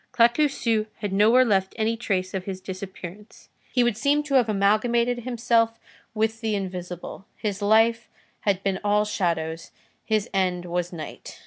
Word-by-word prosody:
Claquesous 235 -3 +2
had 205 -2 -4
nowhere 225 +6 +5
left 190 -4 +1
any 225 +1 +1
trace 190 -5 -2
of 190 -1 -3
his 190 -2 -5
disappearance; 190 +2 -9 0.2
he 250 - +3
would 240 -3 +1
seem 290 +5 +2
to 295 -2 -5
have 250 -4 +4
amalgamated 235 +4 +2
himself 230 -1 +1 0.4
with 220 +1 0
the 220 -2 0
invisible. 180 -1 -6
His 205 -2 -3
life 225 +2 +3 0.3
had 195 -2 0
been 195 -1 0
all 210 0 +2
shadows, 165 -5 -2 0.3
his 215 -2 0
end 180 -2 0
was 175 0 -2
night. 160 -3 -8
210 Hz, 150 wpm, -25 LUFS, 190-230 Hz, 0.4 s, nowhere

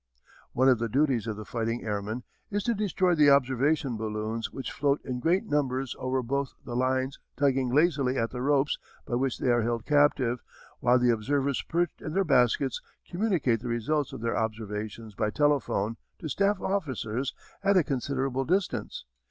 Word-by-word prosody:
] - - -25
One 130 +2 +3
of 130 -3 +5
the 115 0 -1
duties 130 -3 +1
of 110 - -2
the 110 - -7
fighting 115 +1 -2
airmen 105 +3 -3 0.3
is 205 -1 -1
to 235 - +1
destroy 190 -4 +1
the 150 -3 +5
observation 135 -1 +2
balloons 110 +1 -3
which 135 - -5
float 140 0 +1
in 125 -2 -3
great 175 - +2
numbers 135 - -1
over 130 0 -1
both 140 +2 -2
the 120 - -5
lines 130 +1 0 0.2
tugging 135 -3 +2
lazily 140 -3 +2
at 115 -1 0
the 125 - -5
ropes 140 +1 +2 0.3
by - - -6
which 130 +2 0
they 130 - +1
are 120 0 +3
held 115 0 -1
captive 145 -5 +3 0.4
while 125 0 +4
the 125 -1 +4
observers 135 +4 0
perched 170 0 -1
in 155 - -5
their 195 +2 +3
baskets 130 - +2 0.3
communicate 175 - +1
the 125 - -7
results 130 +5 0
of - - -7
their 115 0 -1
observations 110 0 -4
by 105 - 0
telephone 125 -5 +1 0.2
to 165 - -6
staff 200 +6 +1
officers 135 - -2 0.3
at 200 0 +4
a 180 - +5
considerable 135 -1 -1
distance. 180 - -1
130 Hz, 175 wpm, -28 LUFS, 115-145 Hz, 0.4 s, of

